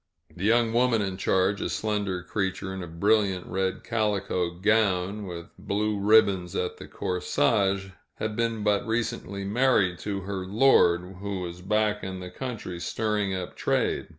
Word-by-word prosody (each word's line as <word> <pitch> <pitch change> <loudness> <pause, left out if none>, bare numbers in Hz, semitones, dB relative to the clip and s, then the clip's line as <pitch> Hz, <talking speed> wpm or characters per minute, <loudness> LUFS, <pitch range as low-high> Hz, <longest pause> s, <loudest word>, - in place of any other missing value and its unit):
The 90 - -4
young 115 +1 +3
woman 120 -3 +3
in 95 -1 -3
charge, 95 +1 +1
a - - -1
slender 100 -4 -2
creature 95 0 -2
in 95 - -5
a 90 - -6
brilliant 95 +2 +1
red 95 0 -2
calico 100 -5 0
gown, 100 +1 +1
with 85 -1 -8
blue 105 0 -1
ribbons 100 -3 +4
at 90 - -2
the - - -10
corsage, 95 +2 0 0.3
had 110 -1 -3
been 115 -2 -1
but 105 +3 +1
recently 110 -4 -2
married 100 -5 +2
to 100 +1 -3
her 95 0 -4
lord, 95 -5 +3
who 100 -1 -4
was 90 0 -6
back 105 +2 +1
in 95 0 -5
the 90 -1 -8
country 110 -6 -5
stirring 105 0 -1
up 90 -1 -5
trade. - - 0
100 Hz, 155 wpm, -27 LUFS, 95-110 Hz, 0.3 s, ribbons